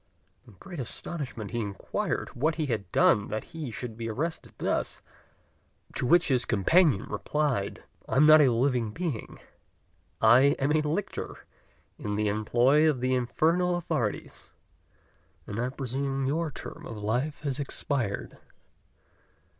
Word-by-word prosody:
In 115 - -15
great 175 -5 -9
astonishment 130 -4 -5
he 120 - -2
inquired 100 -3 -3
what 155 +5 0
he 155 - -1
had 105 -9 -3
done 100 - +4
that 110 - -3
he 160 -5 -5
should 115 0 -6
be 115 0 -4
arrested 160 +9 -3
thus; - - -2 0.9
to 125 - -1
which 175 +4 +4
his 125 -2 +3
companion 120 - +3
replied, 125 -1 -1 0.3
"I - - -1
am 140 +3 +6
not 155 0 +9
a 135 -4 +5
living 120 -2 +1
being: 160 -8 -4 0.8
I 125 +6 +6
am 140 +2 +1
a 155 0 +3
lictor 155 +7 -4 0.5
in 105 -1 -3
the 105 0 +1
employ 120 +9 +3
of 140 -5 0
the 130 +1 0
infernal 165 +8 +1
authorities, 155 -11 -3 0.9
and 105 - -5
I 125 +1 0
presume 135 +1 -2
your 160 +4 0
term - - -9
of 115 - -7
life 120 +8 -2
has 140 -3 -2
expired." 130 -6 -1
130 Hz, 140 wpm, -28 LUFS, 115-155 Hz, 0.9 s, not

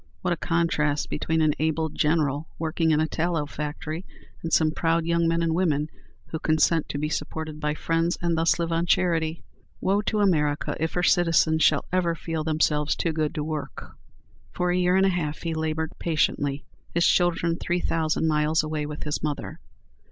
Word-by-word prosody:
What 180 -1 +1
a - - -4
contrast 160 -4 0
between 160 +2 0
an 155 -1 +3
able 160 +1 +1
general 150 -1 0
working 160 0 0
in 155 -1 +3
a 155 - +2
tallow 165 -2 -1
factory, 150 +3 -5 0.4
and 165 - -4
some 155 -1 +4
proud 165 +1 0
young 170 0 +2
men 165 0 +1
and 165 -1 +1
women 155 -4 +1 0.4
who 160 - -3
consent 155 +1 +2
to - - -3
be 150 +1 -1
supported 155 0 -4
by 150 0 -1
friends, 165 +2 0
and 170 -1 0
thus 165 +1 +2
live 170 -1 -2
on 165 +1 0
charity! 165 -2 +1 0.4
Woe 200 +2 +1
to 210 0 -1
America 150 -6 +1
if 160 +1 -1
her 180 - 0
citizens 165 -3 +3
shall 150 -2 +4
ever 175 -2 +1
feel 165 -1 -3
themselves 150 -1 +1
too 165 - -1
good 155 -1 -1
to 150 - -2
work! 155 -1 -5 0.6
For 180 0 -1
a - - +1
year 180 0 +3
and 190 0 +4
a - - +4
half 155 -5 -2
he 165 -1 -2
labored 160 0 -2
patiently, 145 -3 0 0.3
his 170 0 +3
children 170 -1 +2
three 175 0 -1
thousand 160 -1 0
miles 155 +1 +2
away 155 -1 -3
with 150 0 -6
his 150 0 -3
mother. 150 -2 -4
160 Hz, 190 wpm, -25 LUFS, 150-170 Hz, 0.6 s, some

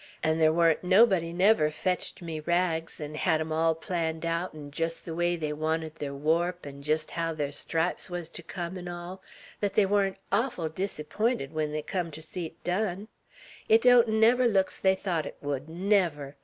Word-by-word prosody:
'N' 160 0 +2
ther 155 -1 +5
wa'n't 165 0 +3
never 195 +6 +6 0.2
nobody 175 -1 +3
fetched 180 +3 -2
me 160 -2 -4
rags, 165 0 -1
'n' 150 0 -6
hed 160 +1 +1
'em 160 0 -3
all 160 +1 +2
planned 165 0 -3
aout, 170 +2 -1
'n' 145 -2 -9
jest 165 +3 -2
ther 165 - -6
way 175 +1 +1
they 155 -3 -3
wanted 160 +1 -2
ther 145 -3 -5
warp, 165 +5 0
'n' 140 0 -9
jest 155 +2 -1
haow 165 -1 -2
ther 145 -2 -1
stripes 165 +5 -2
wuz 175 -1 -4
ter 170 - -8
come, 175 +2 -5
'n' 180 - -8
all, 175 +2 -7 0.4
thet 205 -2 -1
they 210 - +5
wa'n't 195 -1 +1
orful 200 -6 0
diserpynted 195 - -2
when 155 -1 -1
they 155 0 -3
cum 175 +1 -2
ter 155 0 -9
see 165 +1 -5
't 165 - -28
done. 195 +2 -1 0.6
It 225 +1 +6
don't 245 -1 +7
never 225 +3 +4
look's 195 -4 +1
they 190 0 +3
thought 175 -5 -2
't - - -7
would, 145 +1 -4
never! 170 -6 0
170 Hz, 195 wpm, -28 LUFS, 155-190 Hz, 0.6 s, don't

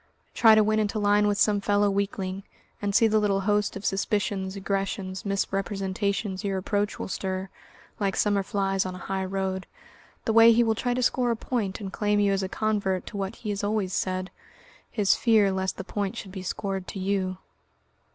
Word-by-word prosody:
Try 225 -2 +7
to 215 - +5
win 215 +1 +2
into 215 0 0
line 205 0 +3
with 205 -1 +1
some 205 -1 +3
fellow 205 +1 +2
weakling, 195 -1 -2 0.4
and 200 -1 -1
see 225 - +6
the 215 0 +3
little 200 -2 +1
host 205 +1 +1
of 200 - -7
suspicions, 195 -1 -1
aggressions, 195 -1 -3
misrepresentations, 195 0 -1
your 195 -1 -1
approach 205 +2 -1
will - - -4
stir 190 0 -3 0.5
like 200 -2 0
summer 205 -1 +2
flies 195 -1 0
on 185 -1 -5
a 180 - -9
high 190 0 -2
road 190 0 -3 0.6
the 225 - +1
way 230 +1 +8
he 235 +1 +4
will 225 -1 +2
try 245 +3 -1
to 255 - 0
score 245 +1 +2
a 235 - +2
point 220 -4 -2
and 195 -2 -6
claim 210 0 +1
you 200 -1 +3
as 195 - 0
a 190 - -3
convert 200 -4 -1
to - - -9
what 195 +2 -3
he 210 - -4
has 200 0 -3
always 205 -3 -1
said, 185 0 -2 0.6
his 205 -3 +2
fear 220 -4 +3
lest 190 0 -2
the - - -5
point 200 +3 -3
should 195 - -7
be 190 -1 -6
scored 190 0 -3
to - - -6
you. 190 -1 -1
200 Hz, 200 wpm, -26 LUFS, 190-210 Hz, 0.6 s, way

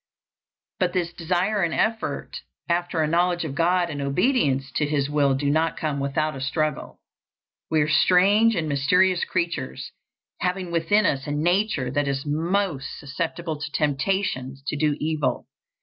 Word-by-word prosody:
But 180 -1 +1
this 175 -2 -1
desire 185 +5 0
and 170 -2 0
effort 225 0 -2 0.3
after 170 -1 0
a - - +1
knowledge 175 +1 +1
of 145 - -4
God 175 +2 +1
and 145 -1 -4
obedience 140 - +1
to 150 - +1
His 145 -1 -1
will 140 -2 +3
do 140 +2 -1
not 160 +3 +1
come 150 -3 -2
without 140 +2 -1
a 135 - -7
struggle. 155 +2 -2 0.7
We 155 -1 +2
are 145 - +1
strange 195 +8 +4
and 165 -4 -1
mysterious 175 +6 +2
creatures, 170 - -3 0.5
having 180 -1 -2
within 170 +5 +2
us 135 -3 0
a - - -2
nature 160 - +1
that 145 +1 0
is 140 0 -2
most 160 0 -1
susceptible 160 +2 -4
to 150 0 -5
temptations, 140 -3 -1
to - - -2
do 150 0 +1
evil. 155 -2 -1
160 Hz, 155 wpm, -24 LUFS, 145-180 Hz, 0.7 s, strange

